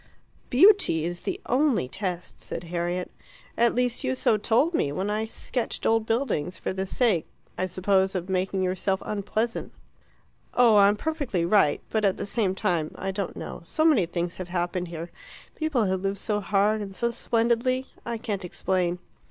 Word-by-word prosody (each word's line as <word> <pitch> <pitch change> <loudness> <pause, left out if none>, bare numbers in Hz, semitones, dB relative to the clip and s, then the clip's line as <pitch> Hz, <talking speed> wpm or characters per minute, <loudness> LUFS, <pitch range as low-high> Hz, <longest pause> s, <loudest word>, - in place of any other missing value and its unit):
"Beauty 300 - +5
is 175 0 -3
the 380 - -3
only 255 - +2
test," 180 +2 -5
said - - -6
Harriet. 175 +1 -3 0.4
"At 235 0 +3
least 245 -1 +1 0.2
so - - +3
you - - +3
told 240 - +2
me 145 - +1
when 190 +7 -2
I 215 +1 -1
sketched 240 +2 -3
old 225 0 +2
buildings 225 - -1
for - - -3
the 190 0 -3
sake, 210 -7 +1 0.3
I 185 - -1
suppose, 190 +1 +1
of 180 -1 -2
making 190 0 0
yourself 190 +1 -1
unpleasant." 215 +3 -2 0.8
"Oh, 235 -4 +6
I'm 200 0 +6
perfectly 275 - -1
right. 175 -5 +3
But 220 -1 +1
at 195 -2 +2
the - - -3
same 200 -2 0
time 165 -5 -1
I 195 - -3
don't 195 -1 -4
know - - -7
so 315 - 0
many 250 - +4
things 170 0 -3
have 185 - -5
happened 175 0 -2
here 170 0 -7 0.4
people 300 -8 0
have 190 -1 0
lived 195 +1 -1
so 210 +1 -1
hard 210 +2 +2
and 195 -2 -7
so 235 +3 0
splendidly 235 +3 +1 0.2
I 235 -1 -3
can't 210 -4 -4
explain." 180 0 -1
200 Hz, 175 wpm, -26 LUFS, 180-230 Hz, 0.8 s, Oh